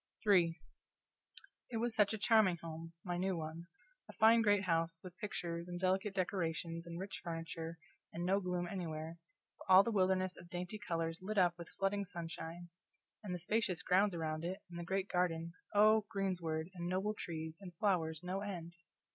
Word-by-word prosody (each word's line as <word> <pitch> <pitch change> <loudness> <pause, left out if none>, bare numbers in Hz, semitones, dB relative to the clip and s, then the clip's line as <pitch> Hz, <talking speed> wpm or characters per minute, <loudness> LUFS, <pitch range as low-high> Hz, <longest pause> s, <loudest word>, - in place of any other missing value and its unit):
CHAPTER 210 - +4
III 170 -3 +4 1.1
It 230 - -2
was 235 +1 0
such 210 -2 +4
a 220 - -1
charming 215 -4 +4
home! 165 0 -7
my 175 -2 -2
new 190 -1 0
one; 160 +2 -5 0.4
a - - -9
fine 225 +1 +6
great 205 -2 +4
house, 165 -2 +1
with 180 -1 -9
pictures, 170 -6 -4
and 175 0 -4
delicate 190 +2 +1
decorations, 170 -2 -1
and 170 0 -5
rich 190 +1 -5
furniture, 165 -1 -4 0.3
and 170 +1 -3
no 195 +2 +3
gloom 180 -2 -1
anywhere, 165 -2 -4 0.4
but - - -4
all 185 +1 +10
the 235 - -1
wilderness 185 -2 +2
of 175 - -12
dainty 180 +4 -4
colors 165 -6 -2
lit 210 +3 -3
up 180 -2 +5
with 170 -1 -9
flooding 200 +1 +1
sunshine; 170 -1 -6 0.5
and 200 - -5
the 180 - -1
spacious 180 -1 0
grounds 190 +1 +3
around 155 -1 -2
it, 185 +4 -4
and 170 - -6
the - - -3
great 190 +2 -1
garden 170 -2 0 0.2
oh, 215 +1 +6
greensward, 175 -4 -1
and 175 -2 -4
noble 190 +4 0
trees, 160 -4 -5
and 180 -3 -9
flowers, 165 -4 +1
no 185 +2 -2
end! 175 -4 -5
180 Hz, 180 wpm, -36 LUFS, 165-195 Hz, 1.1 s, all